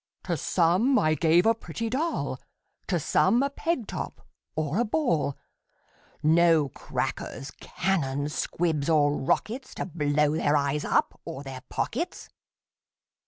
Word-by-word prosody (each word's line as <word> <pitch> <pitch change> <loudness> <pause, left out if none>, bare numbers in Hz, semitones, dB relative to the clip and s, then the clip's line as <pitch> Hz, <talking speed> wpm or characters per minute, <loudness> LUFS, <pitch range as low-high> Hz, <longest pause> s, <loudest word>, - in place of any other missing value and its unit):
To - - -1
some 185 +10 +2
I 155 -6 +3
gave 165 +3 +4
a 225 - +5
pretty 230 0 -5
doll, 300 +8 -1 0.5
To 175 - +1
some 200 - +3
a 280 - -1
peg 320 -5 -1
top, - - -6 0.3
or 155 +4 -1
a - - +4
ball; 210 - 0 0.9
No 160 -2 +4
crackers, 135 +1 -4
cannons, 150 -6 -1
squibs, 160 -4 -1
or 145 -2 +4
rockets, 235 - -1
To - - -3
blow 150 -3 +1
their 150 -1 +2
eyes 140 +1 0
up, - - +1
or 135 - -7
their 135 -2 -7
pockets. - - -3
165 Hz, 130 wpm, -27 LUFS, 145-220 Hz, 0.9 s, a